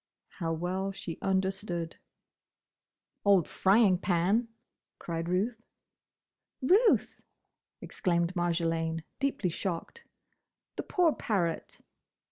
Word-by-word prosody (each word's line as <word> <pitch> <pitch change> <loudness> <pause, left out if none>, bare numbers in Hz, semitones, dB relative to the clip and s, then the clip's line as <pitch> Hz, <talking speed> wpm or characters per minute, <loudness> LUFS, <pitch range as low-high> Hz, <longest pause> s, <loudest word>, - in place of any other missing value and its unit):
How 165 -2 -1
well 180 +4 -2
she 175 -4 -7
understood! 190 -3 -1 1.3
"Old 195 -5 +4
frying 195 -2 +4
pan!" 195 +6 +2 0.5
cried 165 0 -4
Ruth. 220 +6 0 1.0
"Ruth!" 400 - +3 0.6
exclaimed 170 0 0
Marjolaine, 165 -2 0 0.2
deeply 270 -10 0
shocked. 190 - -4 0.7
"The - - -2
poor 345 -4 +2
parrot." 175 -7 -2
185 Hz, 85 wpm, -30 LUFS, 170-205 Hz, 1.3 s, Old